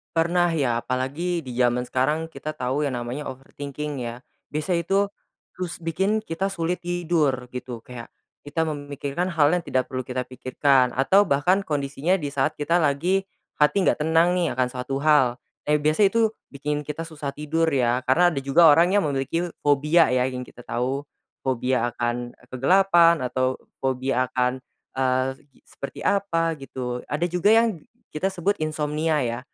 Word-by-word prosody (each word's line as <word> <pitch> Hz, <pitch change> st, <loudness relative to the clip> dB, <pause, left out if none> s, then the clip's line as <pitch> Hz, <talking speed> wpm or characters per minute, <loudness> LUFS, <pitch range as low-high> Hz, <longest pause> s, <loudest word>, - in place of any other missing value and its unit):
Pernah 175 Hz, +1 st, +2 dB
ya 125 Hz, -6 st, +1 dB
apalagi 145 Hz, +7 st, -2 dB
di 125 Hz, -, -6 dB
jaman 125 Hz, 0 st, +2 dB
sekarang 150 Hz, +6 st, 0 dB
kita 155 Hz, 0 st, -6 dB
tahu 130 Hz, +4 st, -1 dB
yang 130 Hz, -, -3 dB
namanya 120 Hz, +5 st, -5 dB
overthinking 140 Hz, +2 st, -6 dB
ya, 120 Hz, +1 st, -6 dB, 0.3 s
biasa 155 Hz, +4 st, -2 dB
itu, 195 Hz, +4 st, +1 dB, 0.5 s
terus 180 Hz, -2 st, -5 dB
bikin 190 Hz, +7 st, 0 dB
kita 165 Hz, +4 st, -2 dB
sulit 175 Hz, -1 st, -2 dB
tidur 160 Hz, -8 st, 0 dB
gitu 125 Hz, -2 st, -6 dB
kayak, 120 Hz, -1 st, -9 dB, 0.4 s
kita 160 Hz, +3 st, -1 dB
memikirkan 145 Hz, +2 st, -3 dB
hal 155 Hz, -5 st, +3 dB
yang 180 Hz, -, +2 dB
tidak 130 Hz, -6 st, -2 dB
perlu 130 Hz, -2 st, -4 dB
kita 125 Hz, 0 st, -2 dB
pikirkan 130 Hz, 0 st, +1 dB
atau 190 Hz, +10 st, +4 dB
bahkan 165 Hz, +7 st, +3 dB
kondisinya 145 Hz, +4 st, 0 dB
di 145 Hz, -6 st, -4 dB
saat 135 Hz, -2 st, 0 dB
kita 165 Hz, +4 st, +1 dB
lagi, 175 Hz, +6 st, +1 dB, 0.3 s
hati 170 Hz, +7 st, +3 dB
nggak -, -, +2 dB
tenang 160 Hz, +3 st, +3 dB
nih 170 Hz, -7 st, 0 dB
akan 130 Hz, 0 st, +1 dB
suatu 130 Hz, +2 st, -4 dB
hal, 145 Hz, -6 st, +4 dB, 0.3 s
eh, 150 Hz, -, +4 dB
biasa 155 Hz, +7 st, +4 dB
itu 220 Hz, +2 st, +2 dB, 0.2 s
bikin 145 Hz, +1 st, -3 dB
kita 150 Hz, +2 st, -4 dB
susah 150 Hz, -4 st, -6 dB
tidur 160 Hz, +2 st, 0 dB
ya 125 Hz, -5 st, +2 dB
karena 175 Hz, +7 st, +5 dB
ada 140 Hz, -, -2 dB
juga 150 Hz, +4 st, +6 dB
orang 175 Hz, +6 st, +4 dB
yang 205 Hz, -, +4 dB
memiliki 155 Hz, +5 st, -1 dB
fobia 150 Hz, +4 st, +4 dB
ya 125 Hz, 0 st, +3 dB
yang 130 Hz, -1 st, -3 dB
kita 125 Hz, -, -14 dB
tahu, 125 Hz, +5 st, -2 dB, 0.4 s
fobia 125 Hz, -1 st, 0 dB
akan, 120 Hz, 0 st, -2 dB
eee, 125 Hz, -, -24 dB
kegelapan 170 Hz, +5 st, +4 dB
atau 130 Hz, +1 st, -1 dB, 0.2 s
fobia 130 Hz, -1 st, 0 dB
akan, 125 Hz, +1 st, 0 dB, 0.3 s
eee, 130 Hz, 0 st, +1 dB, 0.4 s
seperti 140 Hz, -, -8 dB
apa 165 Hz, -5 st, +1 dB
gitu 125 Hz, -3 st, -5 dB
ada 150 Hz, +4 st, 0 dB
juga 180 Hz, +4 st, +2 dB
yang 225 Hz, -2 st, +4 dB, 0.4 s
kita 190 Hz, +5 st, 0 dB
sebut 190 Hz, +2 st, 0 dB
insomnia 155 Hz, 0 st, 0 dB
ya, 120 Hz, -3 st, -2 dB
145 Hz, 165 wpm, -24 LUFS, 130-170 Hz, 0.5 s, juga